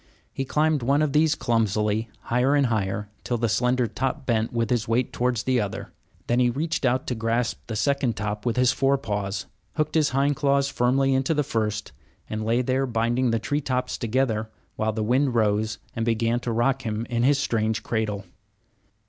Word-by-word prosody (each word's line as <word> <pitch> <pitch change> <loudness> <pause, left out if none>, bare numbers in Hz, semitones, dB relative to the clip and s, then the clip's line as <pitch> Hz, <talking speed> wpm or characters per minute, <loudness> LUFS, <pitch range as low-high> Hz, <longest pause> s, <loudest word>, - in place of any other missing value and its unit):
He 135 - -3
climbed 150 +1 +1
one 140 +5 +2
of 145 -3 0
these 155 0 +4
clumsily, 110 -1 0
higher 125 +4 +2
and 140 -1 +3
higher, 105 0 -1 0.2
till 120 - -1
the 115 0 +1
slender 125 +3 +2
top 130 +5 -3
bent 115 -2 +1
with 115 -1 -1
his 120 -3 +1
weight 120 +2 0
towards 120 -2 0
the 130 -2 +2
other. 100 -2 -5 0.3
Then 120 +1 +1
he 125 -1 +4
reached 145 +4 -1
out 130 +1 +1
to - - -2
grasp 115 +1 -1
the 115 - -4
second 140 0 +1
top 105 0 -3
with 120 -2 0
his 125 0 +4
fore 135 0 +2
paws, 105 -5 -3 0.3
hooked 155 -1 0
his 155 -3 +3
hind 140 +2 +1
claws 140 -2 +2
firmly 135 +2 +2
into 135 +4 +1
the 150 - +2
first, 110 -4 -2 0.4
and 110 0 -3
lay 115 +3 +1
there 130 +2 0
binding 120 +2 +1
the 115 - +2
tree 145 +6 -1
tops 130 -2 -1
together, 115 -2 0 0.3
while 110 0 0
the 110 0 -2
wind 125 +3 +2
rose 110 -1 +1 0.2
and 115 - -1
began 115 +1 +1
to 120 - -3
rock 130 +4 +1
him 110 -1 -3
in 120 -1 -1
his 140 +3 +4
strange 110 -5 0
cradle. 105 -3 -2
120 Hz, 195 wpm, -25 LUFS, 110-135 Hz, 0.4 s, these